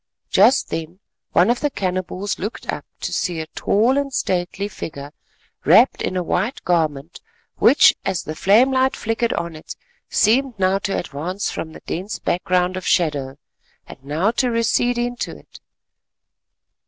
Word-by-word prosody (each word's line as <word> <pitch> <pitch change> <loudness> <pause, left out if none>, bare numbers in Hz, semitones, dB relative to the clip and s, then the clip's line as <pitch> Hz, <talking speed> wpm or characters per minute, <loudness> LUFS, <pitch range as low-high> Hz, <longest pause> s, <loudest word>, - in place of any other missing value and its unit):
Just 230 +8 +4
then 165 +3 -5 0.3
one 180 +7 +4
of 245 - -1
the 295 - 0
cannibals 185 -2 -3
looked 210 +5 -5
up - - -6 0.2
to - - -3
see 175 -3 -1
a 160 - -3
tall 230 - +1
and 280 -1 -3
stately 185 -2 -1
figure 145 -7 -8 0.5
wrapped - - +5
in 185 - -2
a 180 - 0
white 200 +9 -1
garment 160 -3 -1 0.4
which, - - +6
as 180 - -2
the 155 - -5
flame 215 +11 +4
light 260 0 +2
flickered 225 +1 -1
on 170 -1 -4
it, 155 - -9 0.3
seemed 245 +2 +2
now 190 0 +2
to 195 0 -2
advance 175 +6 -4
from 160 -1 -6
the - - -12
dense 190 +5 -4
background 180 +1 0
of 185 - -5
shadow, 140 -6 0 0.5
and - - -13
now 155 +9 0
to 250 +1 0
recede 235 +1 +1
into 240 0 -3
it. - - -17
185 Hz, 155 wpm, -21 LUFS, 170-230 Hz, 0.5 s, which